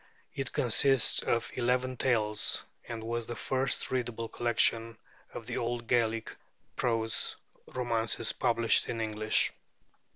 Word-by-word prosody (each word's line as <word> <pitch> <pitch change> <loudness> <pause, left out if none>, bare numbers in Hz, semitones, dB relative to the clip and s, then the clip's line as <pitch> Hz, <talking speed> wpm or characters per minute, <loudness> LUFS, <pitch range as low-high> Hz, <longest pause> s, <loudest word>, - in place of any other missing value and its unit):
It 135 - -4
consists 130 +1 +4
of 115 -1 -1
eleven 125 +1 0
tales, 110 -5 0 0.2
and 115 -1 -6
was 115 0 -3
the 120 - -5
first 130 +2 0
readable 120 -3 -2
collection 115 -1 +1 0.3
of 115 - -8
the 125 +1 -4
old 120 0 -3
Gaelic 115 -1 0 0.4
prose 115 -4 -1 0.3
romances 115 -2 0
published 115 -1 +2
in 115 - -3
English. 110 -1 0
115 Hz, 120 wpm, -30 LUFS, 115-125 Hz, 0.4 s, consists